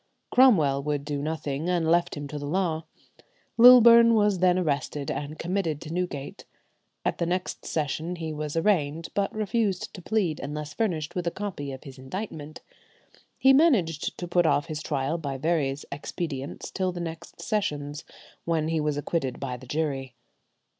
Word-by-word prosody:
Cromwell 160 - +5
would 145 -1 -2
do 145 -1 -3
nothing, 155 0 -3
and 175 -3 +1
left 170 -1 +2
him 145 0 -5
to 150 - -5
the 145 - -5
law. 165 -1 -1 0.7
Lilburne 235 -1 +9
was 205 -3 +3
then 180 0 +4
arrested, 145 -4 -1
and 150 +2 -5
committed 170 -4 -1
to 160 0 -7
Newgate. 175 -6 -4 0.6
At - - -1
the 170 - 0
next 180 +1 -3
sessions 160 +3 -2
he 160 -2 -4
was 150 0 -4
arraigned, 165 -4 +1
but 200 -1 0
refused 215 -3 -1
to 185 - -9
plead 180 -6 0
unless 150 +1 -5
furnished 165 -9 -1
with 175 -1 -3
a - - +4
copy 170 -7 -5
of 130 - -9
his 135 -3 -11
indictment. 155 +1 -7 0.8
He 270 0 +6
managed 225 - +2
to 175 - -5
put 175 -1 +3
off 145 - +2
his 155 -1 -5
trial 145 +2 -1
by 140 -4 -4
various 145 -2 0
expedients 145 -1 -5
till 185 -1 -1
the 175 - -6
next 165 -1 -7
sessions, 150 -8 -2 0.4
when 160 -2 0
he 165 -1 0
was 150 -1 -1
acquitted 145 -3 -2
by 130 -2 -3
the 125 +1 -12
jury. 135 -4 -2
160 Hz, 165 wpm, -26 LUFS, 145-180 Hz, 0.8 s, Lilburne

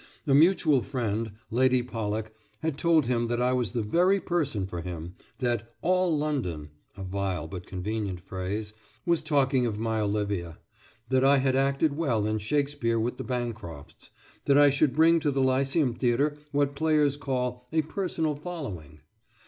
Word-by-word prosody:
A 140 - +2
mutual 155 -2 +5
friend, 115 -4 -2 0.2
Lady 130 +1 +3
Pollock, 110 -2 -4 0.3
had 160 -3 -1
told 160 -1 +3
him 120 -1 0
that 120 +1 -1
I 125 +1 +2
was 120 -6 -1
the 115 - -1
very 180 - +3
person 145 - -1
for 90 -2 -5
him; 85 0 -6 0.2
that 120 -3 -2
"All 185 -3 +2
London" 105 - -2 0.3
(a 95 - -6
vile 95 -3 -3
but 90 +2 -8
convenient 95 0 -3
phrase) 95 +4 -5 0.3
was 170 -2 +2
talking 135 -4 +2
of 105 -2 -3
my 110 0 -1
Olivia; 100 -5 -2 0.5
that 130 0 +3
I 140 +1 +6
had 130 -1 +1
acted 140 +2 +1
well 125 -10 0
in 110 0 0
Shakespeare 140 0 0
with 120 +2 -2
the - - -5
Bancrofts; 115 - -6 0.4
that 140 0 +4
I 145 -1 +7
should 140 -1 +2
bring 165 +2 +5
to 155 -2 0
the 135 -1 +1
Lyceum 135 +1 +2
Theatre 130 +5 +1 0.2
what 140 -1 +1
players 150 -2 +2
call 125 -3 -3
"a 160 -1 +2
personal 160 -2 -2
following." 120 - -7
125 Hz, 165 wpm, -27 LUFS, 105-145 Hz, 0.5 s, I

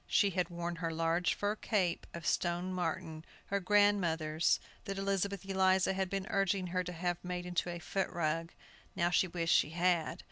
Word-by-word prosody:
She 200 -2 +3
had 180 -1 0
worn 170 0 -4
her 165 0 -2
large 165 +2 +1
fur 205 +1 -1
cape 190 -6 0
of 170 -2 -7
stone 175 +3 0
marten, 165 -2 -3 0.2
her 200 - -1
grandmother's, 175 -6 +3 0.3
that 195 -2 -4
Elizabeth 195 0 -1
Eliza 190 0 +3
had 190 -1 -1
been 195 0 -2
urging 195 -1 +1
her 180 +1 -1
to 180 - -5
have 175 0 -2
made 180 0 -4
into 175 0 -1
a 175 - -4
foot 190 +2 -2
rug. 165 0 -1 0.4
Now - - -1
how - - -6
she 185 - +3
wished 165 -1 0
she - - +3
had! 170 -1 +1
180 Hz, 185 wpm, -33 LUFS, 170-195 Hz, 0.4 s, She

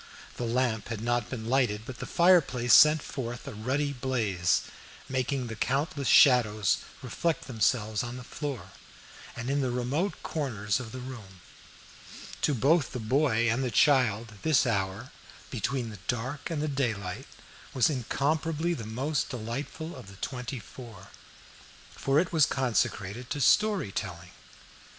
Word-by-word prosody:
The 120 - -2
lamp 115 -2 0
had 115 -2 -5
not 120 -1 0
been 115 -4 -5
lighted, 120 -5 +1
but 130 -1 -8
the - - -5
fireplace 160 - +4
sent 150 +3 +7
forth 120 0 -6
a 135 - -6
ruddy 135 +7 -1
blaze, 110 -9 0 0.5
making 130 0 -1
the 115 -1 -6
countless 140 +4 -1
shadows 110 -7 +5 0.3
reflect 160 +6 -1
themselves 110 -2 0
on 120 0 -5
the 125 - -8
floor, 140 -1 -6 0.6
and 115 +1 -5
in 140 +1 +1
the 130 - 0
remote 135 +10 -1
corners 105 -10 -2
of 115 -3 -7
the 130 - -7
room. 110 -8 -10 1.0
To 145 - +2
both 145 +4 +2
the 125 - -3
mother 130 +3 +1
and 115 +3 +2
the 125 - 0
child, 115 -4 +3
this 150 -7 +3
hour, 95 -5 -2 0.4
"between 125 0 -2
the 105 - -10
dark 125 +4 -3
and 155 -3 -2
the - - 0
daylight" 115 -5 -2 0.5
was 130 - +4
incomparably 155 +5 0
the 115 -9 -6
most 135 +7 -1
delightful 135 +8 -5
of - - -11
the 100 - -12
twenty 125 +5 -5
four, 110 -3 -11 0.8
for 135 +2 +1
it 170 +1 -1
was 155 -4 +5
consecrated 120 -3 -1
to 145 - -3
story 205 - +3
telling. 90 -1 -5
125 Hz, 150 wpm, -28 LUFS, 110-140 Hz, 1.0 s, sent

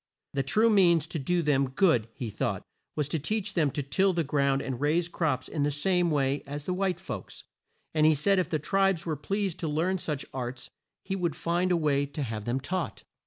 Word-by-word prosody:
The 140 - +1
true 215 +12 +3
means 175 -6 +5
to 160 - -4
do 175 +5 0
them 140 -3 +2
good, 130 - +3
he 120 -5 -4
thought, - - -2 0.3
was 150 -2 0
to 160 - 0
teach 205 +6 -2
them 155 -5 +2
to 145 +1 -3
till 190 +8 +2
the 170 -1 +1
ground 140 -1 +1
and 130 -1 -4
raise 160 +4 +2
crops 150 -7 -1
in 150 - -3
the 145 - +2
same 175 +4 +2
way 140 -2 +1
as 145 +1 -5
the 180 - -2
white 185 -1 0
folks, - - -7 0.5
and 155 -1 +2
he 155 0 +6
said 195 +7 +3
if 185 - -1
the 155 - +1
tribes 195 +3 +1
were 160 -2 -1
pleased 195 +4 -2
to 165 - -2
learn 170 +5 0
such 150 -4 -3
arts, 125 -1 -5 0.3
he 195 - -2
would 170 -5 -1
find 175 +2 0
a 175 - +4
way 145 -3 +1
to 145 +1 -4
have 110 -4 -4
them 120 +3 0
taught. 175 +5 -3
155 Hz, 220 wpm, -28 LUFS, 140-180 Hz, 0.5 s, he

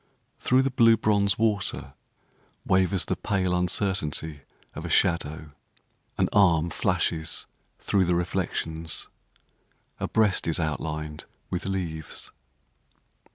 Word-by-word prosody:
Through 130 +1 +3
the 135 - 0
blue 115 -2 +5
bronze 100 -2 +2
water 105 -3 0 0.7
Wavers 95 0 +2
the - - -1
pale 95 -3 0
uncertainty 90 -4 0 0.3
of - - -7
a - - -5
shadow. 80 -2 +1 0.7
An - - +2
arm 85 -4 +4
flashes 85 -4 -1 0.3
through 95 -2 +1
the 90 0 +2
reflections, 80 -2 -2 0.9
A - - -1
breast 105 -6 +2
is 80 +1 0
outlined 75 -1 -3 0.3
with 90 - -2
leaves. 85 -6 -4
90 Hz, 110 wpm, -26 LUFS, 80-100 Hz, 0.9 s, blue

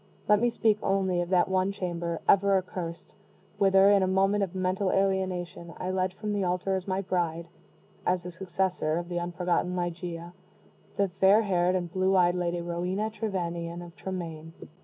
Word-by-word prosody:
Let 210 0 +4
me 240 - +3
speak 220 -2 +2
only 190 -2 +1
of 175 - -4
that 180 -2 +3
one 190 +1 +1
chamber, 170 -3 -3
ever 200 0 +5
accursed, 175 -3 -5 0.5
whither, 195 0 +6
in 200 -1 +5
a 190 - +2
moment 195 +2 +2
of 190 -1 -4
mental 185 +1 0
alienation, 185 -3 -1
I 185 0 -3
led 185 -1 0
from 210 +1 -3
the 200 -1 0
altar 180 +2 0
as 190 0 -4
my 190 0 0
bride 170 -3 -1 0.6
as 180 0 0
the 180 - -6
successor 175 -3 -1
of 175 0 -4
the 175 -1 -1
unforgotten 175 +1 -1
Ligeia 175 -1 -4 0.6
the 200 -1 +2
fair 200 +3 +6
haired 180 -2 +2
and 175 -2 -3
blue 190 +1 +2
eyed 175 -1 +4
Lady 175 -1 -1
Rowena 180 +5 -2
Trevanion, 175 -5 -3
of 170 0 -12
Tremaine. 165 -4 -6
185 Hz, 175 wpm, -28 LUFS, 175-195 Hz, 0.6 s, whither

